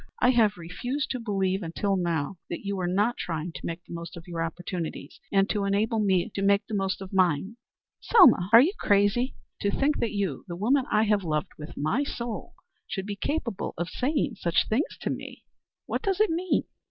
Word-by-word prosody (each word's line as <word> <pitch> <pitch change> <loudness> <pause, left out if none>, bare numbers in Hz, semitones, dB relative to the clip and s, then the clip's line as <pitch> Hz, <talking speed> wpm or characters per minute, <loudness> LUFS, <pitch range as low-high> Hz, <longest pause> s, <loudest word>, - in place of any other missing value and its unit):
I 245 - +5
have 220 -5 +3
refused 245 - -3
to 255 - -2
believe 195 -4 0
until 195 +4 -1
now 170 -1 -1
that 170 - -5
you 200 0 -1
were 185 -2 -1
not 205 +7 +1
trying 165 0 -3
to - - -9
make 170 +1 -5
the - - -10
most 170 0 -7
of 170 +2 -11
your 170 -1 -4
opportunities, 165 -3 -5
and 195 0 +4
to 205 -2 0
enable 210 +3 +1
me 195 0 +2
to 195 - -3
make 200 0 +3
the 225 - -8
most 195 -1 -1
of 195 0 -8
mine." 185 +3 +1 0.4
"Selma, 250 - +6
are 230 +1 +10
you 335 +9 +2
crazy? 205 +6 +2 0.3
To 200 - +1
think 280 +8 +1
that 230 - 0
you, 195 -9 -2
the 175 - -5
woman 250 +8 +2
I 215 - +4
have 210 -2 +2
loved 155 -2 -1
with 150 +1 -7
all - - -3
my 225 - +1
soul, 235 -5 -5 0.3
should 190 -1 -4
be 205 0 -4
capable 235 - -3
of 175 +1 -2
saying 260 - -1
such 170 -1 +2
things 240 +8 -1
to - - -1
me! - - -7 0.4
What - - -2
does 390 -1 0
it 430 -5 +4
mean?" 350 +2 +1
200 Hz, 210 wpm, -27 LUFS, 175-230 Hz, 0.4 s, are